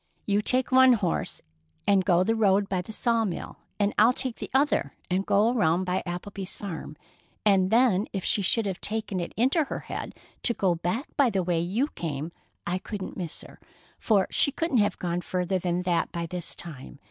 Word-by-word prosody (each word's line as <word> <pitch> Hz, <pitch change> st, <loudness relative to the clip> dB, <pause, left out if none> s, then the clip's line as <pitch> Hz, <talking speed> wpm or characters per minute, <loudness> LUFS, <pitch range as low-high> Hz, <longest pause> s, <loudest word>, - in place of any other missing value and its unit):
You 205 Hz, 0 st, +2 dB
take 255 Hz, +4 st, +1 dB
one 260 Hz, 0 st, +7 dB
horse 195 Hz, -7 st, -2 dB, 0.4 s
and 195 Hz, -2 st, +4 dB
go 180 Hz, -1 st, +3 dB
the 225 Hz, -, +1 dB
road 205 Hz, -2 st, +3 dB
by 185 Hz, -2 st, -1 dB
the 185 Hz, -, -9 dB
sawmill, 225 Hz, -5 st, -1 dB, 0.2 s
and 205 Hz, 0 st, +2 dB
I'll 225 Hz, +4 st, +6 dB
take 255 Hz, -2 st, -4 dB
the -, -, -6 dB
other 270 Hz, -, +1 dB, 0.2 s
and 185 Hz, +2 st, +1 dB
go 210 Hz, +4 st, +4 dB
around 175 Hz, -5 st, +2 dB
by 185 Hz, 0 st, -1 dB
Applebee's 190 Hz, +2 st, -4 dB
farm, 165 Hz, -6 st, -7 dB, 0.5 s
and 190 Hz, -3 st, +4 dB
then 220 Hz, -3 st, +3 dB
if 195 Hz, -3 st, -4 dB
she 205 Hz, -, +2 dB
should 215 Hz, +4 st, +2 dB
have 195 Hz, -2 st, -3 dB
taken 215 Hz, -3 st, -2 dB
it 175 Hz, -, -4 dB
into 270 Hz, +7 st, +3 dB
her -, -, -5 dB
head -, -, -6 dB, 0.3 s
to 235 Hz, -, +2 dB
go 185 Hz, -3 st, +2 dB
back 180 Hz, -, -2 dB
by 280 Hz, -4 st, +5 dB
the 195 Hz, -4 st, 0 dB
way 175 Hz, -1 st, 0 dB
you 200 Hz, -, 0 dB
came, 155 Hz, -, -4 dB, 0.3 s
I 180 Hz, +2 st, -1 dB
couldn't 200 Hz, -1 st, -6 dB
miss 175 Hz, -4 st, -5 dB
her, -, -, -14 dB, 0.4 s
for 205 Hz, -4 st, +3 dB
she 280 Hz, -, +3 dB
couldn't 290 Hz, -1 st, 0 dB
have 205 Hz, -3 st, +2 dB
gone 175 Hz, 0 st, -2 dB
further 185 Hz, +1 st, -1 dB
than 175 Hz, 0 st, -1 dB
that 175 Hz, -2 st, 0 dB
by 170 Hz, -1 st, -3 dB
this 175 Hz, 0 st, -2 dB
time. 135 Hz, -, -8 dB
195 Hz, 195 wpm, -27 LUFS, 175-225 Hz, 0.5 s, one